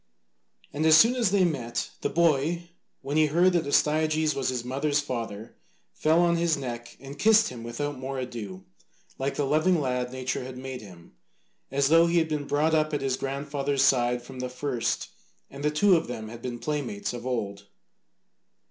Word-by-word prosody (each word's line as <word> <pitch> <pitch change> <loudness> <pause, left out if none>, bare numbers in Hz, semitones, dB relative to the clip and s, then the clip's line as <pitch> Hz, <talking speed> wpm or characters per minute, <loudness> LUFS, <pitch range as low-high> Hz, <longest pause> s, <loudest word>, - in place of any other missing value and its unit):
And 150 - -2
as 160 0 +8
soon 230 +8 +6
as 240 -5 +1
they 195 -1 +3
met, 120 -8 -2
the - - 0
boy, 170 +1 +1 0.3
when 140 +3 -2
he 155 -1 +5
heard 175 +5 +3
that 170 -4 +1
Astyages 155 +1 +2
was 135 -2 -1
his 125 -2 -2
mother's 140 +3 0
father, 115 -6 -5 0.4
fell 160 - +3
on 170 -1 +3
his 170 -2 +1
neck 120 -3 -6
and 140 +2 -10
kissed 220 +1 +5
him 120 - -9
without 130 +4 -4
more 135 +1 -4
ado, 110 -7 -6 0.6
like 135 +1 -2
the 145 - 0
loving 155 +5 +2
lad 125 -3 -1
nature 130 0 -3
had 130 0 -8
made 130 0 -6
him, 90 -8 -14 0.6
as 140 0 +1
though 165 +1 +6
he 170 +1 +1
had 160 -1 +2
been 150 -2 -2
brought 155 +2 +1
up 155 -1 +2
at - - -2
his 135 -1 0
grandfather's 140 0 -1
side 120 -1 +2
from 130 +1 -10
the 125 0 -3
first 125 -1 -2 0.4
and 140 +1 -8
the 150 - +3
two 185 +6 +4
of 165 - 0
them 110 -3 -6
had 120 +1 -10
been 120 -1 -4
playmates 125 -5 -3
of 120 +1 -6
old. 100 -5 -3
140 Hz, 190 wpm, -27 LUFS, 125-155 Hz, 0.6 s, as